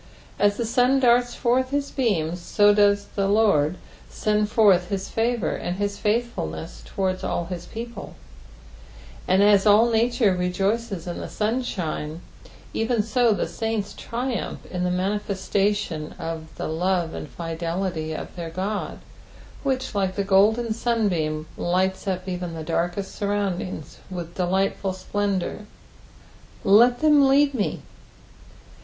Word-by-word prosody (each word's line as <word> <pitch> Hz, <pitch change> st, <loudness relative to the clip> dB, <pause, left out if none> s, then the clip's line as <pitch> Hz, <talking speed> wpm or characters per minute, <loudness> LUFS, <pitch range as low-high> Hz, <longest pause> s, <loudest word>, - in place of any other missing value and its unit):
As 205 Hz, 0 st, +3 dB
the 235 Hz, -, -1 dB
sun 250 Hz, +4 st, +3 dB
darts 245 Hz, -1 st, +3 dB
forth 255 Hz, +2 st, +1 dB
his 280 Hz, 0 st, -2 dB
beams, 175 Hz, -, 0 dB
so 205 Hz, +4 st, +4 dB
does 205 Hz, -1 st, +3 dB
the 195 Hz, -1 st, 0 dB
Lord 195 Hz, -6 st, +3 dB, 0.3 s
send 210 Hz, 0 st, 0 dB
forth 200 Hz, -6 st, +4 dB
his 195 Hz, -1 st, -3 dB
'favour 230 Hz, -4 st, 0 dB
and 175 Hz, +1 st, -3 dB
his 205 Hz, 0 st, -2 dB
f^thfulueas 80 Hz, -, -2 dB
towards 185 Hz, -, -2 dB
all 170 Hz, -, -1 dB
hia 180 Hz, 0 st, -5 dB
people; 235 Hz, -2 st, -7 dB, 1.1 s
and 190 Hz, +2 st, +4 dB
as 205 Hz, 0 st, +5 dB
all 220 Hz, +3 st, +6 dB
nature 230 Hz, -2 st, +3 dB
rejoicea 195 Hz, +3 st, -1 dB
in 175 Hz, -, -4 dB
the -, -, -6 dB
sunshine, 185 Hz, -9 st, -2 dB, 0.5 s
even 225 Hz, -1 st, +1 dB
so 235 Hz, +2 st, +2 dB
the 205 Hz, -, 0 dB
saints 225 Hz, -3 st, -3 dB
triumph 245 Hz, +1 st, -4 dB
in 180 Hz, -1 st, -2 dB
the 180 Hz, -, +1 dB
manifestation 195 Hz, -3 st, -1 dB
of 165 Hz, -2 st, -5 dB
the -, -, -4 dB
love 175 Hz, +1 st, 0 dB
and 150 Hz, -, -6 dB
fidelity 165 Hz, +2 st, -3 dB
of -, -, -7 dB
their 170 Hz, -2 st, -5 dB
God, 195 Hz, +5 st, -3 dB, 0.6 s
which, 265 Hz, -3 st, -1 dB
like 190 Hz, -2 st, 0 dB
the 200 Hz, -, 0 dB
golden 215 Hz, +4 st, +3 dB
sunbeam, 185 Hz, -10 st, 0 dB
lights 190 Hz, +3 st, 0 dB
up 185 Hz, -1 st, -2 dB
even 180 Hz, -2 st, -4 dB
the 160 Hz, -, -5 dB
darkest 175 Hz, +4 st, -2 dB
surroundings 200 Hz, -6 st, -3 dB
Tith 170 Hz, -2 st, -6 dB
delightful 190 Hz, +1 st, 0 dB
splendour. 200 Hz, +1 st, -2 dB, 1.0 s
"Let 235 Hz, +5 st, +5 dB
them 295 Hz, -3 st, +6 dB
lead 280 Hz, +1 st, +4 dB
me." 215 Hz, -6 st, -2 dB
200 Hz, 135 wpm, -24 LUFS, 180-225 Hz, 1.1 s, all